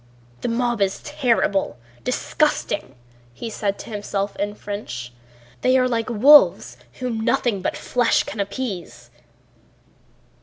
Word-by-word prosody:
"The - - -2
mob 240 -1 0
is 195 -1 +1
terrible—disgusting," 195 - -1 0.4
he 230 - -6
said 200 -2 -2
to - - -9
himself 205 -1 -3
in 205 +1 -2
French. 125 - -6 0.5
"They 255 +1 +4
are 255 -1 +3
like 230 -2 -1
wolves 275 +6 +6 0.2
whom 250 -3 -3
nothing 235 -3 +1
but - - -2
flesh 245 -2 +2
can 210 - -7
appease." 195 - -5
210 Hz, 115 wpm, -22 LUFS, 195-245 Hz, 0.5 s, wolves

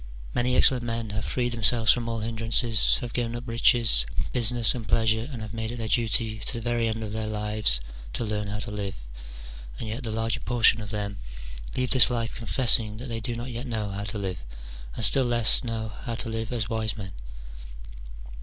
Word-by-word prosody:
Many 125 +1 0
excellent 130 -2 +6
men 115 -2 -4
have 105 +1 -4
freed 120 -1 -1
themselves 115 -1 +3
from 115 0 0
all 115 -1 -3
hindrances, 115 0 +3
have 120 -2 -6
given 120 -1 -2
up 120 - -6
riches, 115 - +4 0.3
business, 120 -1 +3
and 115 -4 -7
pleasure, 110 +3 +1
and 115 -4 -7
have 110 0 -8
made 110 0 -4
it 120 - -7
their 115 -1 -4
duty 115 -1 0
to 110 - -4
the 120 - -5
very 120 0 -1
end 110 0 -3
of 105 -1 -6
their 110 0 -3
lives 105 - +2 0.3
to - - -3
learn 105 -1 -3
how 105 +1 -4
to 105 - -6
live: 100 -2 -5 0.8
and 110 - -6
yet 110 +5 -5
the 120 - -6
larger 115 0 -2
portion 115 -2 +3
of 105 - -8
them 100 -1 -4 0.6
leave 125 -1 -1
this 130 -4 +7
life 115 -1 -2
confessing 115 -2 +2
that 125 +3 -8
they 115 -1 -4
do 120 +1 -5
not 120 +2 -6
yet 120 +3 -6
know 110 -4 -4
how 100 +1 -5
to 105 +1 -4
live, 95 -2 -4 0.6
and 115 - +6
still 130 +7 +5
less 120 -3 +3
know 115 -2 -4
how 115 +3 -7
to 120 0 -3
live 115 0 -4
as 115 -3 -2
wise 110 -1 -2
men. 95 -3 -8
115 Hz, 210 wpm, -25 LUFS, 110-120 Hz, 0.8 s, this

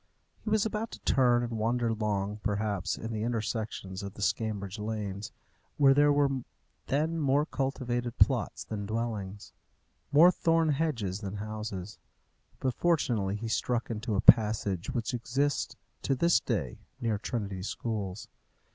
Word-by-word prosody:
He - - -3
was 215 -1 +3
about 220 +1 -2
to - - -8
turn 120 -2 +3
and 115 -2 -3
wander 115 +1 +1
long, 105 -2 -1
perhaps, 100 -3 -1
in 110 +1 -5
the 110 - -2
intersections 110 -4 -3
of 100 0 -7
the 105 - -4
Scrambridge 100 -2 -1
lanes, 105 -2 -4 0.5
where 140 -2 +6
there 145 +1 +5
were 140 -2 +2 0.5
then 160 +4 0
more 145 0 +3
cultivated 125 -4 -2
plots 130 -5 +2
than 100 -2 -5
dwellings, 110 -3 -4 0.6
more 160 +5 +8
thorn 165 -2 +2
hedges 130 - 0
than 100 -2 -5
houses; 105 -2 -5 0.6
but 130 -2 0
fortunately 120 - +1
he 115 +2 -4
struck 120 +1 -1
into 110 0 -2
a 100 - +2
passage 105 -6 +4
which 115 0 -2
exists 135 +4 -1 0.3
to 135 - +1
this 170 +6 +4
day - - -2 0.2
near 110 -3 0
Trinity 100 -5 -3
schools. 105 -1 -4
115 Hz, 145 wpm, -30 LUFS, 105-135 Hz, 0.6 s, more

